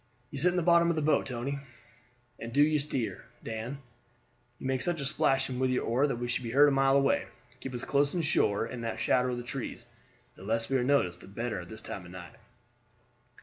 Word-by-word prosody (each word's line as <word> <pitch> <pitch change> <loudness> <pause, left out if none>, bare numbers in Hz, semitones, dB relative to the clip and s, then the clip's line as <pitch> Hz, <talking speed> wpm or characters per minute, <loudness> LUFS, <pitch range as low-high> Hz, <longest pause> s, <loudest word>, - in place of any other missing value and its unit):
"You 140 - -4
sit 175 +6 +5
in 180 - -1
the 175 - +1
bottom 170 0 +5
of 170 - +1
the 155 - 0
boat, 155 - +2
Tony, 135 +3 -3 0.8
and 115 - -6
do 145 +4 +5
you 150 0 +3
steer, 140 -5 -2 0.2
Dan. 115 +4 -5 0.8
You - - -9
make 130 -1 0
such 175 -2 -1
a 140 - -3
splashing 135 -1 +1
with 130 0 +2
your 125 - 0
oar 130 +5 +2
that 135 - -1
we 120 +1 -3
should 120 - -1
be 120 - -5
heard 140 +5 +6
a - - +4
mile 135 0 +4
away. 140 0 +2 0.3
Keep 130 -1 -6
us 120 - -4
close 140 +3 +2
in 170 - 0
shore 105 -8 +2
in 120 +1 -6
the 115 -1 -3
shadow 125 0 +2
of 125 - -2
the 120 - -5
trees; 125 +1 -5 0.5
the - - -16
less 115 +3 -1
we 135 - +2
are 125 - +1
noticed 110 -11 +1
the - - -13
better 115 +2 -3
at 85 -1 -9
this 110 0 -9
time 95 - -6
of 90 - -11
night." 90 +2 -9
130 Hz, 235 wpm, -30 LUFS, 115-140 Hz, 0.8 s, heard